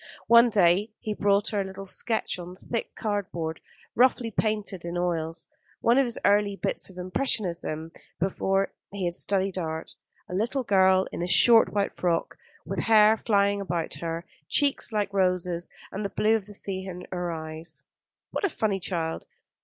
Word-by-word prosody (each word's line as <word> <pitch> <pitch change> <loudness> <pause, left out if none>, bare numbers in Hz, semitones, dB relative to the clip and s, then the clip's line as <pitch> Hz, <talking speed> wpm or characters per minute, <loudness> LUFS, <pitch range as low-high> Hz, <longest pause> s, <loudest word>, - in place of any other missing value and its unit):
One 235 +1 +7
day 195 0 +3
he 215 - -3
brought 200 0 +2
her 205 -2 0
a - - -1
little 190 0 -8
sketch 220 0 -2
on 175 +1 -8
thick 230 +4 -5
cardboard, 180 -6 -3 0.3
roughly 245 -1 +3
painted 210 -4 -1
in 170 +1 -4
oils, 165 -2 -2 0.3
one 235 +3 +4
of 275 - +4
his 235 - -2
early 205 0 +3
bits - - -2
of 185 - -14
impressionism 180 - -2 0.3
before 195 +1 0 0.2
he 200 -1 -4
had 175 -1 0
studied 190 0 -1
art, 160 -1 -4 0.3
a - - -8
little 235 +8 0
girl 190 -3 +4
in - - -5
a 175 - -1
short 225 +5 +6
white 200 -1 -1
frock, 170 -2 0 0.3
with - - -3
hair 220 -1 +6
flying 200 -2 +1
about 170 -3 -3
her 165 0 -3
head, 175 - -32 0.2
cheeks 280 -4 +2
like 205 -2 -1
roses, 180 -2 0 0.2
and 200 - -4
the 200 - -2
blue 215 +3 +2
of 210 -3 -3
the 205 - -10
sea 190 -1 -4
in 180 -1 -7
her 175 -1 -2
eyes. 160 0 -7 0.5
"What - - -3
a 400 - +3
funny 210 -9 -1
child. 165 -3 -3
195 Hz, 175 wpm, -27 LUFS, 175-210 Hz, 0.5 s, One